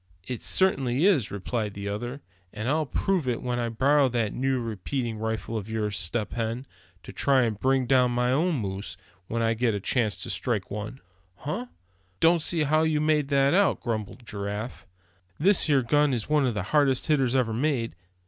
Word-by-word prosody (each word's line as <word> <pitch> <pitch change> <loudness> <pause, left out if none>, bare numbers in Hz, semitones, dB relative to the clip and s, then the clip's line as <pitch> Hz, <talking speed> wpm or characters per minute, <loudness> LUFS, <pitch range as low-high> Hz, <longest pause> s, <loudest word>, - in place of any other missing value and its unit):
"It 125 +2 -5
certainly 140 -6 +1
is," 160 - +3
replied 105 +1 -3
the 100 0 -5
other; 120 +7 -4 0.3
"and 110 +2 -5
I'll 155 +2 +1
prove 180 +2 0
it 120 -2 -1
when 125 -1 -1
I 120 -1 -1
borrow 135 +4 +3
that 115 -4 -1
new 130 0 0
repeating 115 +1 -3
rifle 110 +1 -3
of 110 -1 -4
yours, 105 -2 -2
Step 105 +4 -2
Hen, 115 +2 -3 0.4
to - - -10
try 135 -2 +3
and 110 -3 -1
bring 130 +1 +2
down 125 0 +4
my 125 +1 +1
moose—when 100 - -3
I 115 0 +2
get 115 -1 0
a - - -2
chance 110 -1 0
to - - -4
strike 110 -6 -2
one." 105 +6 -6 0.3
"Huh! 155 - -4 0.5
don't 165 0 +4
see 160 0 0
how 155 +2 +3
you 160 -1 +2
make 150 -2 +2
that 140 +1 +3
out," 200 +1 +3
grumbled 115 +1 -4
Giraffe. 105 +3 -5 0.5
"This 190 +5 +4
here 140 -4 +3
gun 145 +2 +3
is 115 - -4
one 150 -3 +2
of 120 - -1
the 100 - -1
hardest 140 -4 +3
hitters 135 -5 +2
ever 120 -4 +1
made. 125 - 0
125 Hz, 185 wpm, -26 LUFS, 110-140 Hz, 0.5 s, down